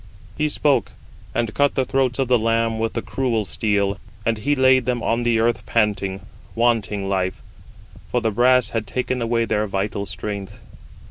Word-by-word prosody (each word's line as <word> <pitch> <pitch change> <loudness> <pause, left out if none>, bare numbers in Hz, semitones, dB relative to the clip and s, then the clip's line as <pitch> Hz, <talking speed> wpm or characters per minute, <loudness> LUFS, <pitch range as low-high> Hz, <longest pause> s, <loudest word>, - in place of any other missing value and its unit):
He 150 0 0
spoke, 145 -1 +1 0.4
and 115 -2 0
cut 145 0 +2
the 130 - +1
throats 130 -1 0
of 135 -2 0
the 125 -1 +4
lambs 115 0 +1
with 115 - -1
the - - -3
cruel 120 -5 -1
steel, 100 +2 0 0.3
and 115 -1 +1
he 145 +7 +1
laid 130 -2 +4
them 120 -2 0
on 115 +1 +1
the 120 -1 +2
earth 115 +1 +1
panting, 100 -4 0 0.3
wanting 110 -4 +1
life; 95 -1 -1 0.7
for 125 - +1
the 115 -2 0
brass 125 0 +4
had 110 -1 -3
taken 125 0 -2
away 115 0 +1
their 105 -1 0
[vital] 100 +1 -2
strength. 100 +1 -6
115 Hz, 175 wpm, -22 LUFS, 105-125 Hz, 0.7 s, the